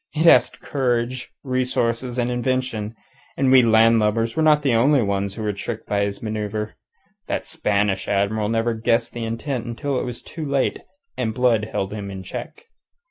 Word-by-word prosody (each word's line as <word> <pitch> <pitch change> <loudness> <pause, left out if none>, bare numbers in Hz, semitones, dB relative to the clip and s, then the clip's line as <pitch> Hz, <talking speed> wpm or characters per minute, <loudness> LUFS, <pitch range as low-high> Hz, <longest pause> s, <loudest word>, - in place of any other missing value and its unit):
It 160 +2 +1
asks 165 - +6
courage, 125 -2 -1
resource, 130 -3 0
and 125 -1 -2
invention. 120 -3 -2 0.4
And 135 -1 +3
we 130 -1 +8
land 115 0 +5
lubbers 115 +2 +1
were 160 - +1
not 150 -1 +4
the 135 -4 +2
only 130 +3 +4
ones 100 -1 -1
he 110 -2 -2
tricked 110 +3 -5
by 100 0 +1
his 100 +1 -5
manoeuvre. 105 0 -3 0.5
That - - -2
Spanish 100 - 0
Admiral 105 +1 0
never 115 +1 +1
guessed 115 +1 0
the 120 - -4
intent 115 +2 -3
until 130 +3 -2
it - - -2
was 125 -1 -6
too 160 - -7
late 140 -2 0 0.4
and 110 -3 -1
Blood 120 -4 +2
held 95 +1 -2
him 100 -2 -5
in 95 -1 -7
check. 450 - -7
115 Hz, 175 wpm, -22 LUFS, 105-130 Hz, 0.5 s, we